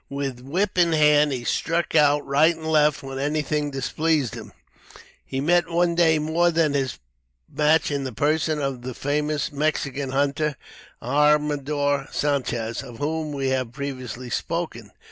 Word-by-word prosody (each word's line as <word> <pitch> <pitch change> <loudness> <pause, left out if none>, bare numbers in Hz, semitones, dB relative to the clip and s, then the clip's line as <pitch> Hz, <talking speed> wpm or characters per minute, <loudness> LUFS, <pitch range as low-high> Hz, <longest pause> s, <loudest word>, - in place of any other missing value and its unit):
With 140 -3 -4
whip 180 +9 -1
in 170 -2 +4
hand, 150 -1 +4
he 125 -3 -3
struck 165 +7 -1
out 150 -2 +4
right 155 +5 +3
and 160 0 -10
left 150 -2 +2
when 135 0 -6
anything 150 +1 -1
displeased 145 -1 -1
him. - - -9 0.7
He 135 - -4
met 175 +4 +2
one 170 0 +2
day 165 -2 +4
more 160 +3 +2
than 160 -3 +1
his 135 -3 -1 0.5
match 155 +1 +2
in 140 -1 -1
the 130 - -4
person 155 +5 0
of 135 -3 -3
the 125 0 -6
famous 150 +1 -1
Mexican 140 -2 -1
hunter, 140 +2 0 0.5
Armador 145 0 +1
Sanchez, 125 -6 -1
of 120 -4 -10
whom 155 +2 -2
we 135 -2 -2
have 130 -3 -1
previously 130 -3 -6
spoken. 155 -9 -3
145 Hz, 150 wpm, -24 LUFS, 135-155 Hz, 0.7 s, in